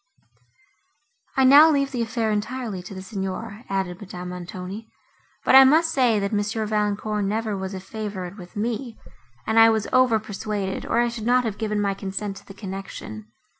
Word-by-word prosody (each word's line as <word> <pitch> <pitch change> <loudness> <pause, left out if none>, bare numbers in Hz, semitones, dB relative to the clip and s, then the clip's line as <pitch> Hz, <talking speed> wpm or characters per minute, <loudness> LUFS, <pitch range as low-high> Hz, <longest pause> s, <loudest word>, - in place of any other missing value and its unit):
"I 265 - +5
now 285 +5 +9
leave 275 -3 +1
the 245 -3 -2
affair 225 -1 -1
entirely 215 -1 -3
to 185 +2 -10
the 190 - -7
Signor," 200 +3 -5
added 190 -1 -2
Madame 180 -2 -7
Montoni, 180 +4 -7 0.6
"but - - +4
I 265 0 +11
must 320 +5 +4
say, 250 -7 +3
that 200 +1 -1
M. 210 +1 -1
Valancourt 210 0 -1
never 215 +1 -1
was 190 0 -5
a - - -5
favourite 195 -2 -6
with 180 -4 -12
me, 230 +2 -3 0.5
and 220 +1 +3
I 225 0 +8
was 220 -2 +1
overpersuaded, 215 -5 0
or - - +1
I 240 - +2
should 230 -1 -5
not 250 +1 +4
have 215 -3 -3
given 210 -2 -1
my 200 -1 +1
consent 195 +1 -4
to - - -15
the 195 - -11
connection. 190 - -7
210 Hz, 175 wpm, -24 LUFS, 195-230 Hz, 0.6 s, I